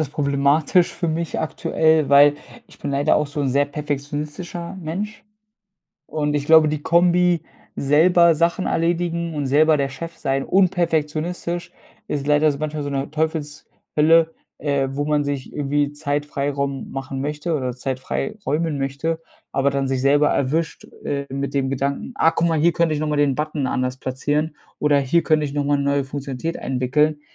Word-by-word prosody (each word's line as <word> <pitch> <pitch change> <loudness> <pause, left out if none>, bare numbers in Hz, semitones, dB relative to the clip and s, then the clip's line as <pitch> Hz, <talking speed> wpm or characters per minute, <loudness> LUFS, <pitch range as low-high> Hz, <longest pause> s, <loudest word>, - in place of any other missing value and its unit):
alles 155 - -1
problematisch 145 +4 +2
für 170 - -2
mich 165 +1 -2
aktuell, 160 -1 +1
weil 145 +1 +7 0.3
ich - - -16
bin - - -4
leider 140 +1 +3
auch 150 - +1
so 145 +1 -4
'n 140 - 0
sehr 140 +2 +2
perfektionistischer 150 +5 -5
Mensch. 200 +8 -5 0.8
Und 150 -1 -2
ich 145 -1 -1
glaube, 160 -1 +7
die 150 -1 -3
Kombi, 175 0 +3 0.3
selber 165 +4 +4
Sachen 170 +3 +1
erledigen 170 0 0
und 145 -2 -2
selber 155 +3 +4
der 140 -1 0
Chef 165 +4 -8
sein 135 0 -1
und 185 -1 +3
perfektionistisch, 170 +1 -2 0.4
ist 145 -1 -3
leider 150 +1 +4
so 140 - -4
manchmal 155 0 -3
so 145 - -4
'ne 140 0 -3
Teufelshölle, 160 +1 0 0.2
äh, 140 -2 0
wo 145 +2 -2
man 150 -1 +1
sich 140 -2 -4
irgendwie 145 0 0
Zeit-Freiraum 145 -2 -2
machen 135 0 -5
möchte 150 +4 -2
oder 130 -3 -1
Zeit 130 0 -3
frei 215 +10 -3
räumen 150 +1 0
möchte, 140 +4 -2 0.3
aber 135 +1 +2
dann 140 -1 -1
sich 130 -1 -1
selber 145 +2 +4
erwischt, 155 +5 -1 0.2
äh, 140 -1 -2
mit 140 0 -3
dem 135 -1 +1
Gedanken: 140 +1 -2
„Ah, 165 - +4
guck 170 0 +1
mal, 160 - +1
hier 170 +3 +3
könnte 165 -2 +1
ich 150 - -2
nochmal 150 -1 -1
den 140 -2 +3
Button 150 -2 -2
anders 130 0 -2
platzieren 145 +4 -2 0.2
oder 145 -1 +3
hier 140 +5 +2
könnte 155 -1 +2
ich 140 - -4
nochmal 145 0 +1
'ne 140 - -1
neue 140 -1 +1
Funktionalität 140 +3 -5
einwickeln." 140 +4 0
150 Hz, 175 wpm, -21 LUFS, 140-160 Hz, 0.8 s, weil